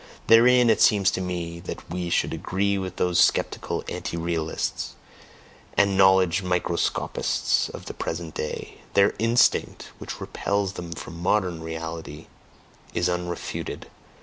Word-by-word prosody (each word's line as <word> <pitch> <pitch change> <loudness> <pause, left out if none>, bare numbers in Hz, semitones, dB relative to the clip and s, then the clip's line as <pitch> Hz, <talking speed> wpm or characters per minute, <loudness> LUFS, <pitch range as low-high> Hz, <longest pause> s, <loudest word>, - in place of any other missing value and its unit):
Therein 120 +1 +6
it 110 - +1
seems 100 -3 +5
to - - -2
me 85 -2 -4
that 85 - -8
we 90 0 -3
should - - +1
agree 100 +2 0
with 95 -1 -5
those 90 -1 +1
skeptical - - +1
anti 85 - -4
realists 85 -1 -2 0.8
and 100 -1 +4
knowledge 95 -1 +5
microscopists 90 -2 0
of - - -9
the - - -6
present 80 -1 -4
day; 75 - -5 0.2
their 100 0 +5
instinct, 115 +2 +2
which - - -7
repels 100 -1 -2
them 85 -2 -7
from 85 +1 -8
MODERN 90 -3 +1
reality, 80 -1 -6 0.7
is 85 - +2
unrefuted... 90 -1 -4
90 Hz, 130 wpm, -25 LUFS, 85-100 Hz, 0.8 s, Therein